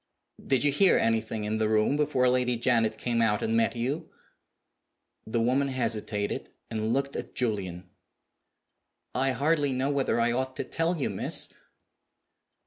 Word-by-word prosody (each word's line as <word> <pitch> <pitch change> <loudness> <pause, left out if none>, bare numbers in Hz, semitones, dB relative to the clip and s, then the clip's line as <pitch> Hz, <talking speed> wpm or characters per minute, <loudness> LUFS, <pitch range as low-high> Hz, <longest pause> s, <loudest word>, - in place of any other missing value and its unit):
"Did 135 -1 +1
you 145 - +3
hear 185 +7 +4
anything 110 -1 0
in 110 +1 -1
the 110 -1 +1
room 110 +5 +2
before 145 -4 +2
Lady 125 -1 +2
Janet 115 -2 +1
came 115 0 0
out 105 -2 +2
and 110 - 0
met 115 +2 +2
you?" 130 +7 -3 1.2
The 115 +1 0
woman 130 +4 +2
hesitated, 110 -5 -2 0.2
and 110 0 -1
looked 140 +2 -1
at - - -6
Julian. 95 -7 -2 1.3
"I 135 +2 +1
hardly 145 +2 +1
know 130 +2 0
whether 140 -4 +1
I 120 0 +2
ought 130 +2 -2
to - - -3
tell 165 +6 -1
you, 145 - -1
miss." - - +1
125 Hz, 150 wpm, -28 LUFS, 110-135 Hz, 1.3 s, hear